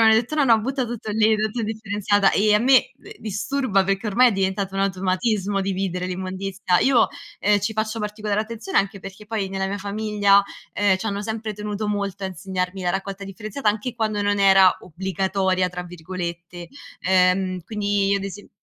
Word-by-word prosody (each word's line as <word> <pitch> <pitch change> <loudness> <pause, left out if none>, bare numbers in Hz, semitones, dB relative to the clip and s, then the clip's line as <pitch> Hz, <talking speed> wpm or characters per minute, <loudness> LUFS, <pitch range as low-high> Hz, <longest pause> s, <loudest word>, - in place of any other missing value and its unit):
mi 225 - +6
hanno 220 - +7
detto: 240 +6 0
"No, 300 -2 +3
no, 230 -4 +5
butta 265 +3 -1
tutto 230 -2 -5
lì, 220 +1 +4
tutta 215 +2 -2
indifferenziata". 205 -2 +1
Ehm, 210 +1 +3
a - - +5
me 260 - +4
d 425 +2 -13
disturba 210 0 0
perché 195 +3 -1
ormai 245 +5 +5
è - - 0
diventato 195 0 -1
un 195 - -1
automatismo 195 +1 0
dividere 185 -2 -2
l'immondizia. 185 0 -1
Io, 260 -4 +4 0.3
ehm, 205 0 +3
ci 210 +3 -1
faccio 215 +1 -2
particolare 210 -1 -2
attenzione 220 -2 -5
anche 195 0 -1
perché 195 +2 -10
poi, 210 -3 -2
nella 190 0 -2
mia 200 +1 -3
famiglia, 205 0 +2 0.3
ehm, 200 -2 +3
c'hanno 205 0 -3
sempre 220 0 -4
tenuto 210 +1 -4
molto 200 -1 -3
a - - 0
insegnarmi 185 +1 -4
la 175 - +1
raccolta 195 +1 -4
differenziata 215 +5 -3
anche 215 +4 -1
quando 215 -3 -1
non 205 0 +1
era 195 -1 +6
"obbligatoria" 190 +1 -1
tra 180 0 -5
virgolette. 175 0 -7 0.3
Ehm, 185 0 +2
quindi 205 -1 0
ad 195 -1 -2
ese 195 +1 -8
200 Hz, 180 wpm, -23 LUFS, 190-215 Hz, 0.3 s, hanno